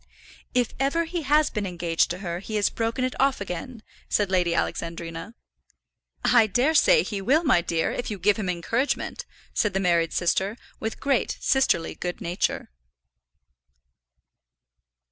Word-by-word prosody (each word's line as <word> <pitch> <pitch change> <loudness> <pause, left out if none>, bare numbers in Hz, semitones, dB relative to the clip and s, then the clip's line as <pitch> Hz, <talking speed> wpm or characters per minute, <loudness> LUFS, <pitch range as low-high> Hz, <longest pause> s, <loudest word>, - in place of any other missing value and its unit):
"If 245 -2 +1
ever 280 +5 +1
he 340 +1 -3
has 300 +1 +3
been 205 -2 -2
engaged 170 -2 0
to 175 - -3
her, 170 0 -3
he 215 +3 -6
has 205 -1 +2
broken 230 +3 -1
it 255 - -2
off 270 0 +3
again," 210 +5 -6 0.3
said 205 -2 +1
Lady 175 -2 +2
Alexandrina. 165 +4 -4 0.9
"I 235 -3 +5
dare 250 +10 +2
say 465 +9 +5
he 205 -3 -4
will, 280 - +3
my 255 - +4
dear, 165 -1 -1
if 245 - -4
you 210 - -4
give 200 +3 +2
him 200 -4 -2
encouragement," 235 - -2 0.3
said 205 -3 0
the - - +2
married 170 -3 +2
sister, 190 +5 0 0.2
with 220 0 -4
great 275 -3 0
sisterly 265 -11 +2
good 180 0 -5
nature. 175 - -2
210 Hz, 150 wpm, -25 LUFS, 175-260 Hz, 0.9 s, I